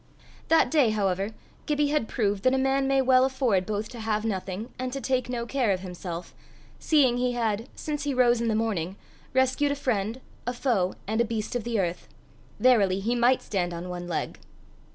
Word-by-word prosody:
That 325 - +4
day, 290 -7 +4
however, 195 -2 0 0.4
Gibbie 295 -1 +1
had 295 -6 0
proved 205 -4 0
that 255 +4 +3
a - - +2
man 270 +1 +1
may 270 -1 +3
well 255 0 +5
afford 255 -8 +1
both 215 0 -2
to 240 - -9
have 220 -1 -1
nothing, 195 +2 -4
and 255 0 -2
to 275 - -3
take 255 -1 -1
no 240 -1 -2
care 250 -2 0
of 185 -2 +1
himself, 180 -2 -7 0.5
seeing 270 -6 +3
he 250 0 0
had, 230 0 -1
since 300 -1 -4
he 285 -2 -1
rose 240 -2 +4
in 235 - 0
the 220 - +1
morning, 195 -5 -1 0.4
rescued 260 +2 +2
a - - 0
friend, 230 -4 -1 0.3
a 245 - 0
foe, 230 -8 0
and 220 +3 0
a - - +4
beast 225 0 -3
of 240 -2 -2
the 235 -3 0
earth. 175 -2 -2 0.5
Verily, 205 -7 +4
he 225 +5 0
might 245 +2 +3
stand 175 -4 -2
on 175 +2 -6
one 175 0 -5
leg! 170 - -3
235 Hz, 200 wpm, -27 LUFS, 195-260 Hz, 0.5 s, well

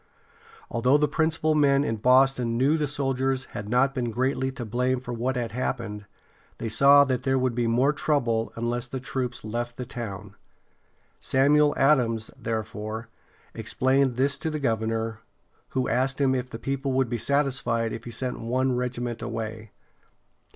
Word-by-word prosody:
Although 125 +5 +3
the 150 0 +2
principal 160 +1 +1
men 140 -2 +4
in 115 -6 -1
Boston 125 0 +3
knew 135 +5 +3
the 150 -2 0
soldiers 135 -1 -1
had 105 0 -6
not 130 +3 +3
been 125 -4 -2
greatly 130 +3 0
to 120 -2 -6
blame 125 +3 0
for 125 -1 -6
what 125 +3 -1
had 120 -3 -2
happened, 110 -4 -4 0.5
they 115 - -4
saw 140 +5 +7
that 130 -3 -1
there 135 0 +1
would 130 -1 +1
be 120 0 0
more 125 +6 +3
trouble 120 -7 0
unless 120 +1 -2
the 130 - -5
troops 125 -1 -4
left 120 +2 -4
the 125 - -4
town. 105 -5 -7 0.9
Samuel 145 +2 +3
Ad´ams, 120 -6 +2
therefore, 110 0 -4 0.4
explained 130 +3 +1
this 140 +2 0
to 160 - -2
the 155 - -3
governor, 115 -3 -1 0.5
who 130 -1 -1
asked 130 +3 0
him 135 -2 +3
if 130 0 -2
the 115 - -6
people 135 +2 -2
would 130 -1 +2
be 120 0 -3
satisfied 125 -4 +1
if 115 - -7
he - - -6
sent 125 +2 -4
one 130 +2 0
regiment 120 -2 -3
away. 110 -1 -5
125 Hz, 165 wpm, -26 LUFS, 115-135 Hz, 0.9 s, saw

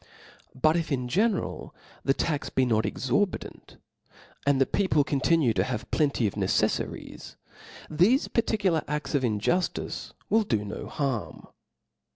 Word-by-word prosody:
Bqt 155 +4 +4
if 165 -3 -2
in 125 -3 -1
general 200 - -1 0.3
the 135 - +2
tax 150 -3 -1
be 130 - +2
not 110 -3 +1
exorbitant, 135 +10 -2 0.7
aqd 140 -1 +4
the 135 - +4
people 170 -6 +2
continue 140 -2 +2
to - - +1
have 120 -4 -4
plenty 140 -6 +1
of 100 - 0
neceflaries, 95 -2 -2 0.5
thefe 185 - +2
particular 200 -8 +1
a&s 150 +2 -3
of 140 -2 +1
in« 110 -4 0
juftice 180 - -1
will 225 - +3
do 110 - -1
no 100 - -6
harm. 135 -7 -3
145 Hz, 140 wpm, -27 LUFS, 125-170 Hz, 0.7 s, Bqt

